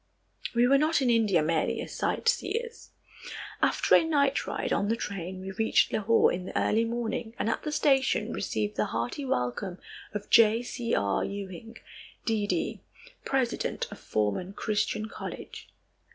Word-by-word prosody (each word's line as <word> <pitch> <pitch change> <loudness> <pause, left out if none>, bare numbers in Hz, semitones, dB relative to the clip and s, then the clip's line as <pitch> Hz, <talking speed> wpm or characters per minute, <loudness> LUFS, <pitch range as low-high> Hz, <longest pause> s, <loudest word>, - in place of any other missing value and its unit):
We 240 +1 +5
were 275 +1 +5
not 310 +2 +3
in 245 - +3
India 210 -8 +3
merely 160 0 0
as - - -6
sightseers. 475 0 -1 0.7
After - - +2
a - - +8
night 285 -3 +1
ride - - -2
on 205 - +1
the 225 - +2
train 190 -4 -5
we 190 +1 -5
reached 220 +3 +2
Lahore 220 +2 +3
in 180 +1 -4
the - - -4
early 225 +2 +2
morning 230 -1 -3
and - - -1
at 225 - 0
the 300 - -4
station 270 -6 +2
received 105 - -2
the 105 - +2
hearty 120 - -3
welcome 175 - -2 0.3
of 210 -1 -6
J. 225 +1 +6
C. 240 -1 -2
R. 100 -1 +1
Ewing, 200 +2 -6 0.5
D.D., 215 -2 -1 0.4
president 260 -3 -1
of - - -9
Forman 110 - -1
Christian 215 +1 -1
College. - - -8
220 Hz, 150 wpm, -28 LUFS, 185-245 Hz, 0.7 s, a